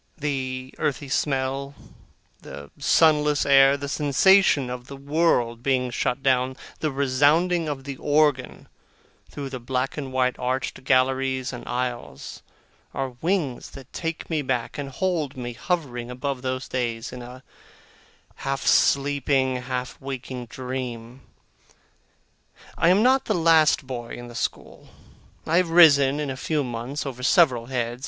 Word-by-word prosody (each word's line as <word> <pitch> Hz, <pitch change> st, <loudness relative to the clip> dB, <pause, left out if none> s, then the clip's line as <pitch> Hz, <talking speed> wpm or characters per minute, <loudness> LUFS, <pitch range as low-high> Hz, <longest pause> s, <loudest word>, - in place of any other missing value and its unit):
The 130 Hz, -3 st, -3 dB
earthy 145 Hz, -2 st, -2 dB
smell, 135 Hz, 0 st, -1 dB, 0.7 s
the 70 Hz, 0 st, -10 dB
sunless 150 Hz, -2 st, +3 dB
air, 135 Hz, 0 st, +6 dB
the 140 Hz, 0 st, -5 dB
sensation 145 Hz, +1 st, +4 dB
of 125 Hz, 0 st, -7 dB
the 140 Hz, -, -9 dB
world 140 Hz, -5 st, +1 dB
being 125 Hz, -1 st, 0 dB
shut 125 Hz, +3 st, -2 dB
out, 130 Hz, 0 st, +2 dB, 0.2 s
the 155 Hz, -, 0 dB
resounding 145 Hz, +5 st, +2 dB
of 135 Hz, -2 st, -5 dB
the 140 Hz, -1 st, -6 dB
organ 145 Hz, -3 st, +1 dB, 0.6 s
through 140 Hz, -2 st, -6 dB
the 130 Hz, -, -5 dB
black 130 Hz, +3 st, -2 dB
and 135 Hz, -3 st, -5 dB
white 130 Hz, -1 st, 0 dB
arched 130 Hz, +1 st, -3 dB
galleries 130 Hz, 0 st, +1 dB
and 125 Hz, -, -8 dB
aisles, 120 Hz, -, -5 dB, 0.5 s
are 135 Hz, -2 st, -3 dB
wings 165 Hz, -8 st, -1 dB
that 135 Hz, 0 st, -13 dB
take 165 Hz, -1 st, -4 dB
me 160 Hz, -3 st, -1 dB
back, 125 Hz, -1 st, -3 dB
and 140 Hz, -1 st, -4 dB
hold 155 Hz, -2 st, -2 dB
me 120 Hz, -1 st, -5 dB
hovering 125 Hz, -5 st, -3 dB
above 130 Hz, +1 st, -4 dB
those 130 Hz, 0 st, -3 dB
days, 115 Hz, -3 st, -3 dB
in 125 Hz, -, -7 dB
a 125 Hz, +2 st, -11 dB, 0.9 s
half 135 Hz, 0 st, -3 dB
sleeping 140 Hz, -2 st, +2 dB
and 125 Hz, -, -8 dB
half 125 Hz, -1 st, -4 dB
waking 130 Hz, -2 st, -6 dB
dream. 125 Hz, -1 st, -6 dB, 1.5 s
I 170 Hz, -, +3 dB
am 195 Hz, +4 st, +4 dB
not 260 Hz, +2 st, +3 dB
the 215 Hz, -, 0 dB
last 160 Hz, -3 st, +4 dB
boy 120 Hz, -3 st, -6 dB
in 120 Hz, 0 st, -9 dB
the -, -, -11 dB
school. 120 Hz, -, -5 dB, 0.6 s
I 165 Hz, -, +2 dB
have 180 Hz, -2 st, +2 dB
risen 145 Hz, -5 st, +6 dB
in 145 Hz, -2 st, -2 dB
a 130 Hz, -, -6 dB
few 150 Hz, +2 st, -1 dB
months, 125 Hz, +4 st, -5 dB
over 130 Hz, -2 st, -6 dB
several 130 Hz, -5 st, +3 dB
heads. 120 Hz, -2 st, -3 dB
135 Hz, 145 wpm, -24 LUFS, 125-145 Hz, 1.5 s, air